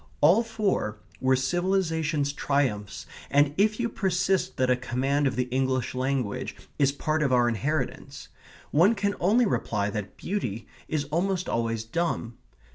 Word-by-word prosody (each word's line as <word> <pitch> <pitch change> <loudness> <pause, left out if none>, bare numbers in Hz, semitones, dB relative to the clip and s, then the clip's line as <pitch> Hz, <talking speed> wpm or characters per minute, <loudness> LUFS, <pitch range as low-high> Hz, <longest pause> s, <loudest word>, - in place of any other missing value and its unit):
All 175 +10 +6
four 210 - -1 0.2
were 130 0 +3
civilization's 160 -1 0
triumphs, 125 -9 -1 0.2
and 145 0 +3
if 215 +4 +2
you 240 - +1
persist 190 -3 0
that 130 0 +2
a - - +5
command 130 +3 0
of 130 - -1
the 125 - +1
English 130 -1 0
language 130 -4 -2 0.2
is 140 -1 +4
part 155 +2 -1
of 140 -3 +1
our 120 -1 +4
inheritance, 130 +5 -3 0.4
one 185 +9 +5
can 200 -1 0
only 220 +8 +4
reply 105 - -1
that 105 -1 -5
beauty 115 - -3 0.2
is 150 -2 -1
almost 185 +3 0
always 115 -1 -1
dumb. 120 -2 -2
145 Hz, 145 wpm, -27 LUFS, 125-180 Hz, 0.4 s, All